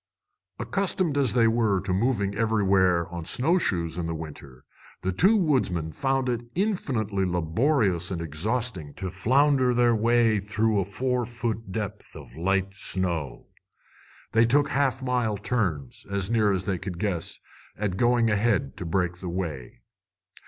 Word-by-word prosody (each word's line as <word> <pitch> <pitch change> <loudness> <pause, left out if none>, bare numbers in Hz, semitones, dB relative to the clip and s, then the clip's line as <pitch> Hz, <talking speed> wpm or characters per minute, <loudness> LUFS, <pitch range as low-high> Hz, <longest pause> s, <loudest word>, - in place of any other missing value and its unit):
Accustomed 185 -5 -1
as 135 -5 +2
they 115 -2 +4
were 115 -4 +2
to 95 0 -2
moving 100 -1 0
everywhere 100 -5 +2
on 85 -1 -6
snowshoes 95 - 0
in 85 - -2
the 85 - -3
winter, 70 -4 -10 0.4
the 95 - 0
two 190 - +4
woodsmen 120 - 0
found 135 - 0
it 120 -2 -1
infinitely 130 - -1
laborious 90 - +1
and 90 -3 -3
exhausting 85 - -3
to 95 -2 -4
flounder 130 +5 +3
their 120 -1 +4
way 115 -1 +3
through 110 +1 0
a 95 - 0
four 125 +6 -1
foot 115 -3 -4
depth 105 0 -5
of - - -11
light 95 +3 0
snow. 90 -6 0 0.9
They 115 +1 +4
took 140 +3 +3
half 135 -1 0
mile 125 -5 0
turns, 90 - -3
as 100 +1 -1
near 110 -3 +3
as 95 -2 -1
they 95 -2 -2
could 95 -2 -6
guess, 95 -4 -2 0.4
at 100 -3 -2
going 120 -1 +3
ahead 120 +6 +1
to 90 - -6
break 90 0 0
the 90 - -5
way. 80 -10 -5
105 Hz, 150 wpm, -26 LUFS, 90-125 Hz, 0.9 s, they